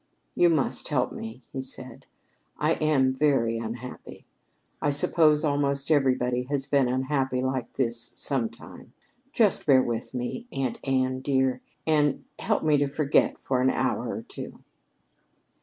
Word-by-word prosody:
"You 175 - +4
must 155 -5 +1
help - - 0
me," 115 +3 -8
he 135 - -3
said. 130 -2 -6 0.5
"I 155 +2 +2
am 140 -5 +2
very 130 -5 +1
unhappy. 120 +2 -8 0.6
I 145 - +1
suppose 150 +1 +4
almost 140 -1 0
everybody 130 -4 +2
has 140 -2 0
been 140 -2 +2
unhappy 130 0 0
like 130 -2 -2
this 120 -3 0
sometime. 115 -1 -4 0.4
Just 220 - +2
bear 130 -3 +6
with 120 +2 -4
me, 125 - -4
Aunt 130 -3 -2
Anne, 130 -1 0
dear, 130 - 0 0.2
and 150 -3 +2 0.2
help - - 0
me 155 -2 +4
to 145 - +2
forget 140 +1 +1
for 130 -2 -1
an 130 - +3
hour - - -1
or - - -4
two." - - -9
135 Hz, 140 wpm, -26 LUFS, 125-145 Hz, 0.6 s, bear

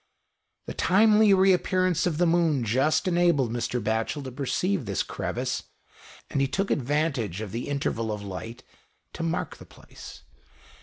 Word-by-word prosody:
The - - -6
timely 210 +2 +4
re 190 0 +5
appearance 185 -1 +1
of 160 -4 -1
the 175 - +3
moon 165 -6 +2
just 130 - +1
enabled 170 -9 +2
Mr. 120 +1 -2
Batchel 110 +6 -2
to 130 - -6
perceive 140 +6 -1
this 100 -1 -1
crevice, - - -3 0.7
and 140 - 0
he 135 - +2
took 195 +8 -2
advantage 135 - -1
of 110 -3 -6
the 115 +2 -4
interval 115 -5 -2
of 105 -1 -5
light 100 +4 -7 0.5
to - - -6
mark 165 +1 -2
the - - -13
place. - - -13
145 Hz, 155 wpm, -26 LUFS, 115-175 Hz, 0.7 s, re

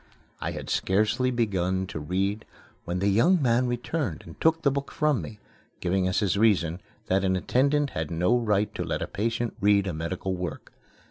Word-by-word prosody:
I - - -2
had - - -6
scarcely 105 +6 +1
begun 95 -6 0
to 85 - -6
read 95 +7 -1 0.4
when 90 +1 -2
the 100 +2 0
young 140 - +4
man 125 -2 +2
returned 120 - -2
and 80 - -13
took 160 0 +3
the 140 - +4
book 140 +1 -3
from 150 -8 +1
me, 105 +7 -8 0.4
giving 90 +1 +1
as 95 - +1
his 100 -1 +1
reason 90 -6 +2 0.2
that 95 +1 +1
an 95 -1 +2
attendant 140 +8 +1
had 80 -1 -3
no 90 +8 +2
right 105 -3 +1
to - - -3
let - - -2
a - - -4
patient 115 +2 -2
read 100 0 +4
a 95 - -2
medical 90 +4 -3
work. 90 -1 -6
100 Hz, 190 wpm, -26 LUFS, 90-120 Hz, 0.4 s, young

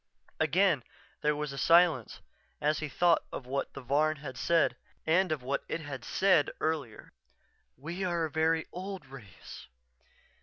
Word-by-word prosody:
_" - - -35
Again 165 -3 +3 0.4
there 150 0 +2
was 150 -1 -4
a 140 - -5
silence 165 - +4 0.4
as 150 0 +1
he 155 - -4
thought 170 +2 +3
of 130 - -6
what 135 +2 -3
the 140 - -6
Varn 150 +5 +2
had 140 -3 -8
said 165 +7 +2 0.3
and 175 +2 +3
of 150 -5 -2
what 135 +2 -2
it 165 - -2
had 140 -4 -7
said 185 -7 +3
earlier: 150 -8 -3 0.7
"_We 175 +6 -3
are 170 -2 0
a 155 - -6
very 160 +1 +1
old 190 +1 -6
race.... 115 -10 -12
155 Hz, 160 wpm, -30 LUFS, 140-170 Hz, 0.7 s, silence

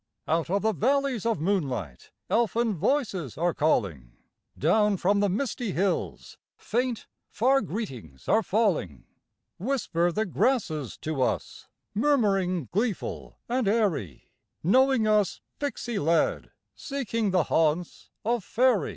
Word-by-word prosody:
Out 165 +1 0
of 200 +2 0
the 220 0 +2
valleys 260 +1 +1
of 225 -8 0
moonlight 135 - -2 0.2
elfin 230 0 +1
voices 190 - -1
are 170 +1 +1
calling; 90 - 0 0.4
Down 205 +6 +3
from 200 +3 +2
the 205 0 +2
misty 225 0 -2
hills 190 +1 -2 0.2
faint, 245 0 -2 0.2
far 270 +4 +3
greetings 125 - -6
are 220 - +4
falling; 185 - 0 0.6
Whisper 185 -7 0
the 215 +5 0
grasses 170 - 0
to 155 -4 -2
us, - - -2 0.3
murmuring 200 - +1
gleeful 210 +1 -2
and 245 -2 0
airy, 195 - -1 0.3
Knowing 260 - +4
us 210 -2 +2 0.2
pixy 240 -6 -3
led, 165 +1 +1 0.2
seeking 230 -6 -2
the 180 -3 +3
haunts 160 +2 0 0.2
of 235 -2 0
faery. 240 - +2
200 Hz, 120 wpm, -27 LUFS, 165-235 Hz, 0.6 s, are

